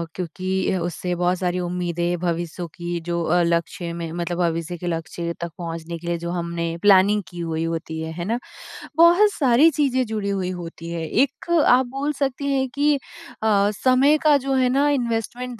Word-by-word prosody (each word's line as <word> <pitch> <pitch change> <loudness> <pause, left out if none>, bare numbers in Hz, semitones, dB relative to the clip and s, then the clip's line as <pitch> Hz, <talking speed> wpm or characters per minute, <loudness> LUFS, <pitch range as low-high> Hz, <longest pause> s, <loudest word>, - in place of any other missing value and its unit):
क्योंकि 185 +1 -2
उससे 175 +1 -3
बहुत 180 +1 +1
सारी 180 -1 -1
उम्मीदें, 175 0 -2
भविष्यों 175 0 -3
की 175 0 -4
जो 170 0 -2
अ, 175 +2 +2
लक्ष्य 170 0 -1
में 165 -1 -5
मतलब 175 0 -3
भविष्य 170 0 -1
के 175 - -6
लक्ष्य 170 0 -3
तक 170 -1 -4
पहुँचने 165 -1 -5
के 170 - -9
लिए 170 0 0
जो 170 0 -4
हमने 170 -1 -3
प्लानिंग 205 +1 +5
की 175 -1 -10
हुई 165 -1 -2
होती 165 -1 -4
है, 160 0 -4
है 170 +1 -5
ना? 230 +4 -1 0.6
बहुत 350 +5 +6
सारी 275 +3 +5
चीजें 260 -3 +1
जुड़ी 215 -2 -3
हुई 190 -2 -1
होती 165 0 -8
हैं 170 -1 -3
एक 280 +5 0 0.2
आप 255 +1 +5
बोल 275 +4 -2
सकती 280 0 -2
हैं 265 -1 +1
कि 290 +1 +3 0.5
अ, 205 -2 +3
समय 265 +4 +5
का 300 -2 +6
जो 270 0 -2
है 255 -1 +3
ना 280 +3 +2
इन्वेस्टमेंट 240 -2 -2
180 Hz, 185 wpm, -22 LUFS, 170-250 Hz, 0.6 s, बहुत